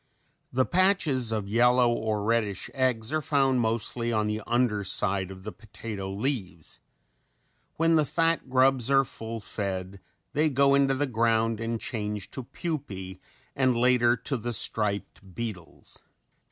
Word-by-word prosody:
The 130 +1 +2
patches 175 - +2
of 105 -3 -2
yellow 120 +2 +4
or 110 -3 -2
reddish 110 -3 -1
eggs 130 -2 0
are 155 - +1
found 135 -4 +2
mostly 115 +1 -1
on 110 -2 +1
the 105 +1 -2
under 120 -4 +1
side 95 -1 +1
of 95 -1 -10
the 110 - -5
potato 105 -3 -7
leaves. 100 - -4 1.0
When 165 0 +3
the 155 - +4
fat 165 -1 0
grubs 130 -1 +3
are 135 0 +5
full 115 -3 -6
fed 95 -2 -4 0.3
they 155 +2 +2
go 140 0 +3
into 135 -1 +3
the 145 +2 0
ground 115 -2 +1
and 115 0 -2
change 105 -4 -4
to 130 - -6
pupae 105 - -5 0.4
and 130 -2 +2
later 120 0 +4
to 130 +4 -2
the 120 +1 -4
striped 100 -3 -1
beetles. 110 -8 -6
115 Hz, 145 wpm, -27 LUFS, 105-135 Hz, 1.0 s, are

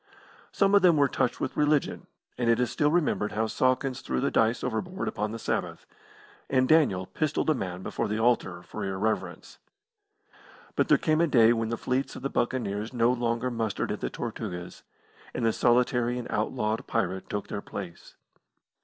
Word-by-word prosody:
Some 200 0 +2
of 200 - +7
them 175 -3 +5
were 140 -1 +5
touched 125 - -1
with - - -3
religion, 150 -1 +1 0.3
and 120 -1 0
it 115 - +4
is 125 -1 0
still 145 +3 +2
remembered 150 -10 +1
how 110 +1 0
Sawkins 130 +3 0
threw 65 - -2
the - - 0
dice 115 +2 +2
overboard 180 - -3
upon 105 +1 -2
the 115 - -5
Sabbath, - - -3 0.6
and 130 -1 +3
Daniel 135 - +3
pistolled 155 +4 0
a - - +4
man 95 -7 -5
before - - -2
the 105 +1 -2
altar 110 -7 +1
for 85 - -7
irreverence. 100 +3 -3 1.2
But - - +2
there - - +5
came 155 -1 +1
a 170 - +4
day 120 -5 +5
when 115 -1 -1
the 115 - -2
fleets 130 +4 -2
of - - -9
the 140 - -2
Buccaneers 110 -2 -1
no 120 0 +3
longer 120 0 -1
mustered 115 -3 -2
at - - -3
the - - -2
Tortugas, 90 0 -6 0.5
and 120 - -1
the 115 - +3
solitary 120 0 +2
and 125 - -4
outlawed 110 0 -1
pirate 95 0 -2
took 105 - -3
their 100 - -4
place. 95 -5 -8
120 Hz, 180 wpm, -27 LUFS, 105-130 Hz, 1.2 s, of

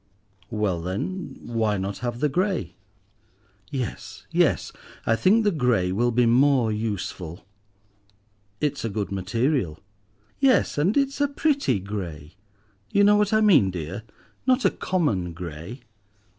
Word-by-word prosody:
"Well 105 -5 -1
then, 105 - -4
why 110 -3 0
not 95 +1 -4
have 120 0 -4
the 150 - +4
grey?" 175 - -1 1.0
"Yes—yes, 130 -6 -1 0.3
I 115 - +3
think 205 - +4
the 205 - +3
grey 125 - +1
will 120 +6 +1
be 120 +1 +3
more 125 -1 +4
useful." 100 -5 -4 1.1
"It's 145 -2 -1
a 115 - -1
good 100 -1 -3
material." 100 - 0 0.6
"Yes, 265 - +3
and 185 - +2
it's 275 0 +1
a 285 - +4
pretty 280 - +1
grey. 90 -6 -6 0.6
You 200 - +3
know 205 +1 +6
what 210 -1 +2
I 215 0 +4
mean, 175 - +5
dear; 90 +3 -5 0.5
not 255 0 +3
a - - +5
common 105 - -1
grey. 85 - -8
115 Hz, 130 wpm, -25 LUFS, -, 1.1 s, know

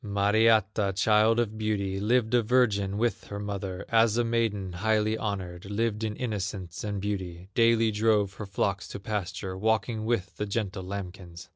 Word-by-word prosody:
Mariatta, 105 0 +3
child 110 +3 +4
of 110 -2 -1
beauty, 100 -3 -1
Lived 115 +2 +1
a 120 - +5
virgin 105 -4 +2
with 120 +2 -1
her 100 - -6
mother, 100 -2 -4
As 115 -1 +4
a 120 - +3
maiden 110 -5 -1
highly 110 +3 +1
honored, 95 -5 -4
Lived 105 +2 -1
in 110 -1 -2
innocence 100 -6 -4
and 100 -2 -3
beauty, 95 -3 -4
Daily 115 -1 +4
drove 105 -2 +2
her 105 0 -7
flocks 100 0 -1
to - - -7
pasture, 95 -3 -4
Walking 110 +2 0
with 110 -4 -1
the 105 - -2
gentle 100 -2 -2
lambkins. 90 -2 -7
105 Hz, 160 wpm, -28 LUFS, 95-110 Hz, -, a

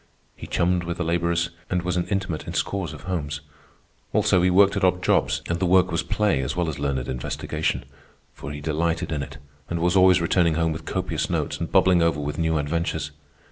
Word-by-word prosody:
He - - -9
chummed 90 0 +1
with 85 0 -4
the 90 - -1
laborers, 85 0 0 0.2
and 90 -1 0
was 90 0 -1
an 90 0 -1
intimate 95 -5 -2
in - - -5
scores 95 -4 -1
of 75 - -10
homes. 75 -6 -3 0.7
Also, 105 -4 +3
he 90 - +3
worked 100 +2 +5
at 100 - -1
odd 90 0 +2
jobs, - - +2
and 85 0 -1
the 95 - +1
work 90 0 +4
was 85 -1 +1
play 85 -2 +1
as 65 +1 -3
well 90 -1 0
as 75 -3 -4
learned 70 -3 -1
investigation, 75 +4 -2 0.5
for 70 - -8
he 75 0 -7
delighted 80 +2 -1
in 75 -2 -1
it 70 0 -7 0.3
and 85 - -2
was 90 +2 +1
always 95 -1 +6
returning 85 -1 +2
home 80 0 +1
with 80 +1 -6
copious - - -2
notes - - -2
and 85 - -4
bubbling 95 -2 +4
over 85 -3 +2
with 75 +1 -4
new 80 -1 +1
adventures. 80 +3 -2
85 Hz, 215 wpm, -24 LUFS, 80-90 Hz, 0.7 s, always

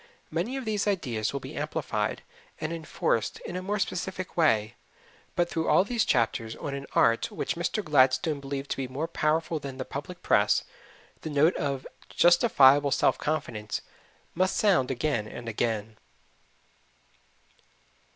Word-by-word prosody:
Many 180 +12 -2
of 265 - -5
these 210 -2 -1
ideas 125 - -1
will 140 - -3
be - - -9
amplified - - -2 0.4
and 155 +1 -3
enforced 155 -8 -1
in 175 - -7
a 185 - -2
more 200 +3 -2
specific 185 -1 -3
way; 115 - +2 0.6
but 175 -1 +2
through 165 -1 -2
all - - +5
these 230 +2 0
chapters 115 -1 0
on 140 - -5
an 140 0 -5
art 115 0 +3
which - - -3
Mr. 170 +5 -1
Gladstone 145 +1 +3
believed 140 0 -5
to - - -1
be 135 -1 -2
more 140 +6 -3
powerful 160 0 0
than 140 -2 -7
the - - -4
public 145 +6 -7
press, 100 +1 +3 0.6
the 160 - -5
note 150 +4 +3
of 140 -2 -2 0.2
justifiable 145 - +5
self - - +2
confidence 110 -8 -3 0.5
must 185 +2 +1
sound 180 -12 +3
again 125 -4 -1
and 120 +2 -8
again. 110 -1 -2
145 Hz, 150 wpm, -28 LUFS, 130-175 Hz, 0.6 s, all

